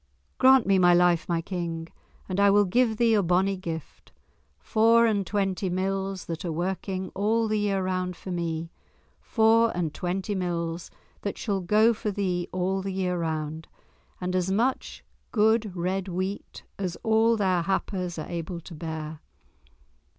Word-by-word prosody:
"Grant 260 -1 +6
me 195 -1 +3
my 175 -1 +6
life, 175 -1 +3
my 170 -1 +1
King, 170 -3 -4 0.4
and 185 0 -2
I 200 0 +6
will 205 +1 +5
give 225 +3 +2
thee 230 -1 +3
a 210 - +4
bonnie 185 +2 +2
gift—four 215 +6 -1
and 205 -4 +1
twenty 195 -2 -1
mills 190 +1 -2
that 165 +2 -5
are 175 - -2
working 185 +2 -3
all 220 +3 +1
the 215 0 0
year 200 -2 0
round 185 -1 -2
for 185 - -8
me—four 175 +7 0
and 165 -4 -1
twenty 190 +4 -2
mills 170 -2 -3 0.3
that 200 - -4
shall 200 -4 -2
go 215 +6 +4
for 215 -1 -3
thee 185 -3 -2
all 185 +1 -1
the 195 0 -4
year 185 -1 -1
round, 160 -1 -3 0.5
and 180 0 -2
as 185 +1 0
much 240 +7 -1 0.3
good 220 -2 +2
red 185 +2 -2
wheat 185 +2 -4 0.2
as 185 -3 -2
all 225 +1 +3
their 185 -4 +2
happers 180 -1 -2
are 155 - -5
able 170 0 -5
to 170 +1 -11
bear." 160 -1 -6
185 Hz, 155 wpm, -26 LUFS, 175-205 Hz, 0.5 s, Grant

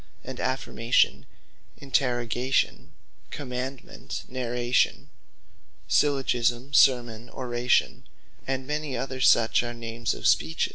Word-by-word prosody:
And - - -8
Affirmation, 125 -2 +1 0.5
Interrogation, 125 -1 0 0.4
Commandement, 130 0 -6
Narration, 125 -1 0 0.8
Syllogisme, 130 -2 +1
Sermon, 120 -4 +3
Oration, 125 -1 0 0.4
and 130 0 -2
many 150 -2 -3
other 130 +1 -4
such, 115 -2 +4
are 120 0 -5
names 115 -1 -3
of - - -8
Speeches. 80 +2 +2
125 Hz, 90 wpm, -26 LUFS, 120-130 Hz, 0.8 s, such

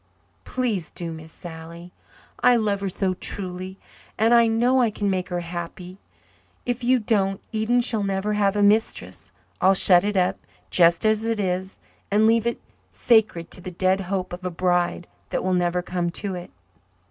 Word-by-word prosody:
Please 225 -10 -2
do, 170 -1 -6
Miss 160 0 -10
Sally. 170 +1 -10 0.5
I 250 - +5
love 210 -3 0
her 195 - -1
so 185 0 -1
truly 185 0 -5 0.4
and 225 +2 +3
I 235 -1 +6
know 240 +3 +3
I 235 - +3
can 205 -1 -2
make 185 -1 -2
her 175 -1 -2
happy. 175 +2 -7 0.7
If 245 0 -2
you 255 +2 +4
don't, 200 -4 0
Eden 225 +3 +1
shall 230 -3 -1
never 195 +1 -1
have 205 -1 +1
a 205 - +2
mistress. 200 - 0 0.3
I'll 190 +1 +5
shut 180 -1 +6
it 205 -1 -1
up, 180 -1 +1 0.3
just 170 +1 +4
as 215 0 +2
it 225 -1 -1
is, 190 0 -2 0.3
and 210 +2 +3
leave 225 +1 +3
it 235 - -2 0.3
sacred 215 -8 +2
to - - +1
the 185 - -6
dead 185 +2 +1
hope 185 -1 -3
of 180 +1 -8
a 180 - -2
bride 175 0 0 0.2
that - - -2
will 185 - 0
never 180 0 0
come 175 -1 -2
to 195 +3 -3
it." 175 -1 -7
190 Hz, 180 wpm, -23 LUFS, 180-220 Hz, 0.7 s, I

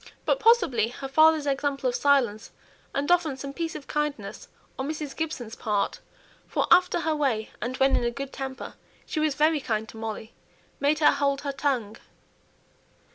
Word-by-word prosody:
But, - - +2
possibly, 440 - +4
her 260 +3 -7
father's 310 +2 +5
example 275 -1 0
of 245 - 0
silence, 245 -7 +2 0.4
and 285 +4 -1
often 330 -6 +2
some 275 +1 -6
piece 330 +1 -3
of 280 - -7
kindness 300 0 -3 0.3
on 270 +2 -2
Mrs. 300 -2 -5
Gibson's 265 -8 -4
part 210 -2 -1 0.5
(for - - 0
after 360 -1 +5
her 320 -1 0
way, 255 -8 0
and 250 +4 -3
when 270 +1 +4
in - - +1
a 240 - +2
good 275 +3 -6
temper, 265 -1 -6 0.3
she - - -3
was 305 -2 +1
very 310 +1 +3
kind 220 -3 -2
to - - -11
Molly), 220 0 -6 0.5
made 290 +2 +2
her 300 - +5
hold 280 -1 0
her 280 - -2
tongue. 265 -6 -1
275 Hz, 175 wpm, -26 LUFS, 245-305 Hz, 0.5 s, father's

